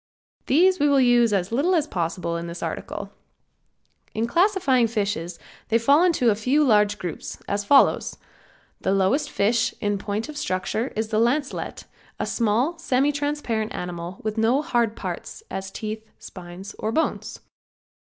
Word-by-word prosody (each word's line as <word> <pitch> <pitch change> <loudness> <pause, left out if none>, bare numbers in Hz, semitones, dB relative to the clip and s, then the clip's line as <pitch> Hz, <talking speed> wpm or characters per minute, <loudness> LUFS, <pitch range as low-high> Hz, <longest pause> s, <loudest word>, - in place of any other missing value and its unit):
These 365 +6 +4
we 290 0 +3
will 280 -1 +4
use 240 -3 +4
as 195 -1 0
little 305 +10 +2
as 315 -4 +2
possible 170 - -2
in 170 0 -4
this 170 +1 -7
article. - - -5 1.0
In 225 - 0
classifying 280 - +3
fishes 200 -6 -2 0.3
they 230 - +3
fall 280 +8 +4
into 315 -10 +3
a - - +1
few 255 +8 +2
large 210 -5 +3
groups, 175 -4 -6
as 205 0 -1
follows: 275 +5 +4 0.6
The 190 - 0
lowest 235 +11 +1
fish 225 -1 +1
in 205 -1 -1
point 205 +4 -3
of 305 -1 -8
structure 185 +3 -1
is 220 0 -2
the 215 -1 +1
lancelet, 265 +5 -1 0.3
a - - -1
small, 240 +9 0
semi 275 -2 +2
transparent 290 -7 -2
animal, 175 +1 -5
with 215 0 -2
no 245 +6 +2
hard 235 -8 0
parts, - - -6
as 190 0 -4
teeth, 215 +2 -5
spines 180 +2 -10
or 220 - -1
bones. 320 +7 -2
225 Hz, 155 wpm, -24 LUFS, 200-285 Hz, 1.0 s, These